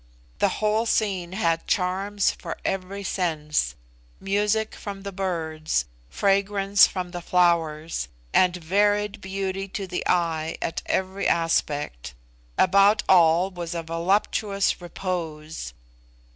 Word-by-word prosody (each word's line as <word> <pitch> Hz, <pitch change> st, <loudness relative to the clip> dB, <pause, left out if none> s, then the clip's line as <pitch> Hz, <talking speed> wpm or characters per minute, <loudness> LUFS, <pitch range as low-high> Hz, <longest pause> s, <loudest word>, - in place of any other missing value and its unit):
The -, -, +3 dB
whole 215 Hz, +2 st, +1 dB
scene 190 Hz, -6 st, 0 dB
had 165 Hz, -5 st, 0 dB
charms 195 Hz, +2 st, +1 dB
for -, -, -7 dB
every 195 Hz, +1 st, -3 dB
sense 155 Hz, -6 st, -1 dB, 0.4 s
music 210 Hz, +2 st, 0 dB
form 200 Hz, -1 st, -7 dB
the 200 Hz, -, -5 dB
birds, 160 Hz, -, -2 dB, 0.2 s
fragrance 200 Hz, -, +3 dB
from 180 Hz, -2 st, -5 dB
the 175 Hz, -1 st, -5 dB
flowers, 165 Hz, -, +1 dB, 0.3 s
and 180 Hz, -1 st, +4 dB
varied 205 Hz, +4 st, +1 dB
beauty 195 Hz, 0 st, -3 dB
to 195 Hz, +1 st, -5 dB
the 180 Hz, -1 st, -3 dB
eye 165 Hz, -2 st, 0 dB
at 165 Hz, -, -3 dB
every 190 Hz, +1 st, -1 dB
aspect. 145 Hz, -, 0 dB, 0.4 s
About 200 Hz, +3 st, +5 dB
all 175 Hz, +1 st, +5 dB
was 175 Hz, -1 st, -5 dB
a 165 Hz, -, -3 dB
voluptuous 195 Hz, +4 st, 0 dB
repose. 165 Hz, -, -5 dB
185 Hz, 115 wpm, -25 LUFS, 165-200 Hz, 0.4 s, About